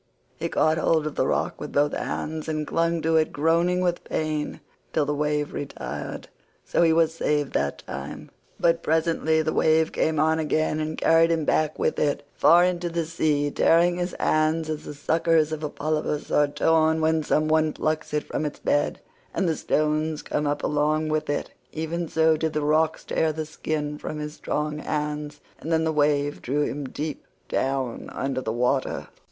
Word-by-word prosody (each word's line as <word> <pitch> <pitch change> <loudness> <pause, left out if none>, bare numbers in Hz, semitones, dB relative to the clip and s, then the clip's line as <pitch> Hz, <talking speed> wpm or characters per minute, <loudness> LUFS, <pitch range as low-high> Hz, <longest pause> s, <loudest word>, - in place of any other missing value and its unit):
He - - -3
caught 155 +1 +2
hold 160 -1 +2
of 155 - -3
the - - 0
rock - - -1
with - - -6
both 145 +1 +2
hands 160 0 -3
and 155 -1 -1
clung 165 0 0
to 160 0 +3
it 155 -1 +2
groaning 170 +4 +2
with 175 -1 0
pain 155 -1 -2 0.3
till 150 - +2
the 150 - -1
wave 150 0 -1
retired, 145 - -6 0.4
so - - +1
he 165 -1 +5
was 160 0 +3
saved 150 -3 0
that 70 0 -1
time; - - -7 0.3
but 165 0 +3
presently 160 0 +1
the 155 - -1
wave 160 0 +3
came 155 -1 0
on 160 +1 +3
again 155 0 0
and 155 0 -3
carried 165 0 +4
him 165 -2 +1
back 155 0 +1
with - - 0
it 145 -1 0
far 175 +1 +6
into 180 -1 0
the 170 -1 -1
sea—tearing 165 +2 +2
his 175 0 -3
hands 155 +1 +1
as 155 - -5
the 150 - -7
suckers 160 +1 +2
of 155 0 -4
a 150 - -1
polypus 150 0 -2
are 145 - +4
torn 160 +2 +2
when 160 0 +2
some 155 0 +1
one 155 0 +3
plucks 155 0 -2
it 150 0 0
from - - -3
its 150 -1 -3
bed, 145 - 0 0.4
and 190 - +1
the 160 - +1
stones 155 +1 0
come 150 0 -1
up 145 - -1
along 155 +1 +1
with 155 -1 -1
it—even 160 +3 -4
so 160 0 +3
did 160 0 -2
the 150 - 0
rocks 155 +2 +2
tear 160 - 0
the 155 0 -4
skin 150 -1 -3
from 155 - -5
his 150 0 -5
strong 150 0 -3
hands, 150 -1 -3 0.2
and 165 - -5
then 160 0 +3
the 160 0 0
wave 145 -1 +1
drew 145 +4 0
him 145 -1 -3
deep 150 +1 -5 0.2
down 135 -2 -2
under 135 -1 -2
the 110 - -2
water. 125 +3 0
155 Hz, 185 wpm, -25 LUFS, 150-160 Hz, 0.4 s, far